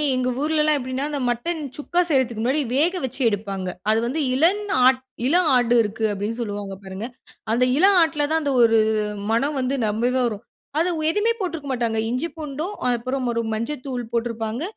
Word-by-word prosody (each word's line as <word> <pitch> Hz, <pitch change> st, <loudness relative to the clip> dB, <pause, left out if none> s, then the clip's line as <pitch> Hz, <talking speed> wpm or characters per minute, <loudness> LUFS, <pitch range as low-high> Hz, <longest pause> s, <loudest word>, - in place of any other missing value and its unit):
எங்க 255 Hz, 0 st, 0 dB
ஊர்லெல்லாம் 305 Hz, 0 st, +2 dB
எப்படின்னா, 260 Hz, +2 st, -3 dB
அந்த 290 Hz, -1 st, -3 dB
மட்டன் 320 Hz, +8 st, -2 dB, 0.2 s
சுக்கா 345 Hz, +4 st, 0 dB
செய்றதுக்கு 255 Hz, -6 st, +1 dB
முன்னாடி 265 Hz, +6 st, +1 dB
வேக 345 Hz, +6 st, +2 dB
வெச்சு 260 Hz, +2 st, -6 dB
எடுப்பாங்க. 200 Hz, -3 st, -3 dB, 0.2 s
அது 220 Hz, +1 st, +4 dB
வந்து 265 Hz, +7 st, -2 dB
இளம் 340 Hz, +10 st, +3 dB, 0.3 s
ஆட் 260 Hz, 0 st, +3 dB, 0.3 s
இளம் 345 Hz, +4 st, +3 dB
ஆடு 245 Hz, -1 st, +3 dB
இருக்கு, 220 Hz, +1 st, -2 dB
அப்படீன்னு 205 Hz, +3 st, -3 dB
சொல்லுவாங்க 205 Hz, -3 st, -4 dB
பாருங்க. 190 Hz, +3 st, -6 dB, 0.5 s
அந்த 250 Hz, +2 st, +3 dB
இளம் 385 Hz, +4 st, +5 dB
ஆட்ல 310 Hz, -3 st, +1 dB
தான் 320 Hz, 0 st, +2 dB
அந்த 285 Hz, -1 st, 0 dB
ஒரு 225 Hz, -1 st, +5 dB, 0.5 s
மணம் 275 Hz, +6 st, +1 dB
வந்து 260 Hz, +1 st, 0 dB
ரெம்பவே 240 Hz, +5 st, +1 dB
வரும். 215 Hz, -1 st, -5 dB, 0.4 s
அதை 340 Hz, +3 st, +2 dB
ஒ -, -, -2 dB
எதுவுமே 420 Hz, +6 st, +1 dB
போட்டிருக்க 330 Hz, -7 st, -4 dB
மாட்டாங்க. 230 Hz, -3 st, -1 dB
இஞ்சி 255 Hz, +7 st, -1 dB
பூண்டும் 310 Hz, +6 st, -5 dB, 0.2 s
அப்புறம் 255 Hz, +2 st, -2 dB
ஒரு 230 Hz, -, 0 dB
மஞ்சள் 250 Hz, +5 st, -3 dB
தூள் 250 Hz, -3 st, -3 dB
போட்டிருப்பாங்க. 230 Hz, +1 st, -2 dB
255 Hz, 175 wpm, -23 LUFS, 230-305 Hz, 0.5 s, இளம்